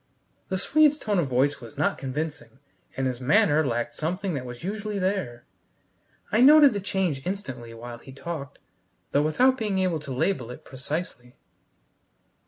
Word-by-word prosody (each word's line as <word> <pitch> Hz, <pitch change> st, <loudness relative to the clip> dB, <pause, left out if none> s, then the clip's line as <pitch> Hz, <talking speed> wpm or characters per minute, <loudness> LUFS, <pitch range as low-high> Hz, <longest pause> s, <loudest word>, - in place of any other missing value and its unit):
The 190 Hz, -, 0 dB
Swede's 300 Hz, +8 st, +4 dB
tone 210 Hz, -9 st, 0 dB
of 160 Hz, -, +1 dB
voice 135 Hz, +3 st, +1 dB
was 115 Hz, -2 st, -11 dB
not -, -, 0 dB
convincing, 150 Hz, +1 st, -5 dB, 0.4 s
and 135 Hz, -, 0 dB
his 130 Hz, -1 st, -2 dB
manner 155 Hz, -, +4 dB
lacked 120 Hz, -3 st, -2 dB
something 180 Hz, -, -2 dB
that 130 Hz, -3 st, -4 dB
was 120 Hz, +2 st, -9 dB
usually 210 Hz, +2 st, -3 dB
there. 185 Hz, -11 st, -2 dB, 0.9 s
I 220 Hz, -, +3 dB
noted 290 Hz, 0 st, +8 dB
the 205 Hz, -, -2 dB
change 185 Hz, -7 st, -1 dB
instantly 130 Hz, -, -5 dB
while 120 Hz, 0 st, -8 dB
he 135 Hz, -, -13 dB
talked, 140 Hz, 0 st, -6 dB, 0.5 s
though 145 Hz, -, +3 dB
without 255 Hz, -, +3 dB
being 210 Hz, -3 st, -1 dB
able 185 Hz, -4 st, +1 dB
to 140 Hz, -2 st, -8 dB
label 130 Hz, -1 st, 0 dB
it 125 Hz, -, -10 dB
precisely. 130 Hz, -2 st, -6 dB
155 Hz, 160 wpm, -26 LUFS, 130-195 Hz, 0.9 s, noted